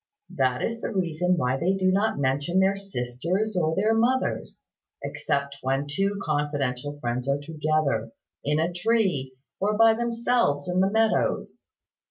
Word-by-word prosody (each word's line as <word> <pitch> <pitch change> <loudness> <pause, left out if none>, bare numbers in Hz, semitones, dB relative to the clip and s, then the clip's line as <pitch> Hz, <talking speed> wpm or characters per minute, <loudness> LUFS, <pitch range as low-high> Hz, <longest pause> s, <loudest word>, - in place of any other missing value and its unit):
That 130 -2 0
is 230 0 -2
the - - -3
reason 180 -2 0
why 130 -4 +1
they 180 +6 +1
do 185 -1 +2
not 200 0 +1
mention 140 +6 +1
their 190 +1 +3
sisters 185 - -2
or 160 -3 +1
their 215 +3 +2
mothers 245 +4 0 0.4
except 140 0 -2
when 135 +2 0
two 195 +7 -1
confidential 145 -2 -2
friends 125 +1 -2
are 140 - +2
together, 150 -6 -1 0.3
in 150 +1 +1
a 170 +2 0
tree, 180 - 0 0.2
or 210 +2 +1
by 225 0 +6
themselves 235 -9 0
in 180 0 0
the 190 +1 +3
meadows. 220 +1 0
170 Hz, 150 wpm, -26 LUFS, 140-200 Hz, 0.4 s, by